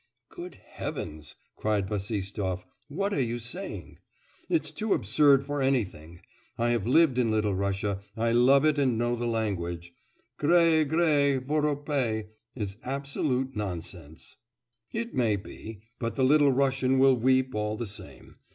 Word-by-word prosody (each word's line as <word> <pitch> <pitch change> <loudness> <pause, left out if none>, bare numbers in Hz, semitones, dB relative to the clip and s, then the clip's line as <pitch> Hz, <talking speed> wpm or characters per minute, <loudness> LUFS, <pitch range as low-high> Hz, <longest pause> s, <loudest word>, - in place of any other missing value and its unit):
'Good - - -9
heavens!' 75 0 -7 0.2
cried 105 -3 0
Bassistoff. 100 -2 -3 0.2
'What 200 +7 -2
are 140 - +1
you 120 -1 -1
saying? 120 - -6 0.5
It's 155 -1 +1
too 210 +7 0
absurd 140 -2 +4
for 145 0 -2
anything. 95 - -1 0.4
I 120 +1 +1
have 115 -3 0
lived 135 -1 +4
in 120 -2 +2
Little 105 -2 +1
Russia, 100 +1 -1 0.2
I 115 +1 +1
love 130 +4 +5
it 150 -1 +3
and 130 -5 +2
know 120 +1 0
the 120 0 -3
language... 85 -7 -3 0.4
"grae, 165 0 +4
grae, 145 -3 +3
voropae" 140 -5 -1 0.3
is 105 -4 -4
absolute 135 -1 -2
nonsense.' 85 -6 -6 0.5
'It 235 +1 -4
may 115 -4 +2
be, 105 +1 -9 0.2
but 115 -1 -3
the 135 - +1
Little 145 +1 +5
Russian 135 0 +2
will 135 0 +6
weep 130 +2 +2
all 105 0 -1
the 120 - -3
same. 105 0 -10
120 Hz, 140 wpm, -28 LUFS, 105-140 Hz, 0.5 s, will